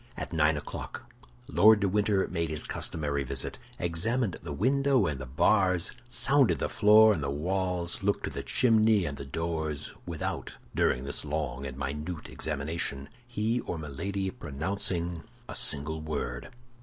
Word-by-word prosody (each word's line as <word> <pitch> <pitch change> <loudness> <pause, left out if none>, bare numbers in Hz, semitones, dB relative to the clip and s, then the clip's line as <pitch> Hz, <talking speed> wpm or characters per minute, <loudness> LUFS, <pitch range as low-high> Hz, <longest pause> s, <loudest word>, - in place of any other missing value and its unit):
At - - -5
nine 80 -1 +3
o'clock, 75 - -7 0.4
Lord 110 0 +6
de 100 - +3
Winter 100 0 +2
made 85 -3 -2
his 75 -1 -1
customary 70 -3 -3
visit, 65 - -2 0.2
examined 95 +6 -1
the 85 - -6
window 130 - +2
and 75 -5 -2
the 65 - -6
bars, 90 +6 +3 0.2
sounded 120 - +3
the - - -1
floor 110 +1 +7
and 80 - -3
the 70 - -2
walls, 90 +3 -1
looked 100 +1 0
to - - -2
the - - -4
chimney 110 -5 +3
and 70 - -3
the 70 - -7
doors, 80 0 -3
without, 85 -3 -4 0.2
during 65 - +2
this 70 +1 0
long 70 -3 -3
and 65 -1 -7
minute 75 +4 -4
examination, 75 -2 -2 0.2
he 115 0 0
or 90 - -4
Milady 95 +6 -3
pronouncing 85 +2 -1 0.3
a - - -6
single 75 +2 +1
word. 70 -6 -4
85 Hz, 155 wpm, -29 LUFS, 75-100 Hz, 0.4 s, floor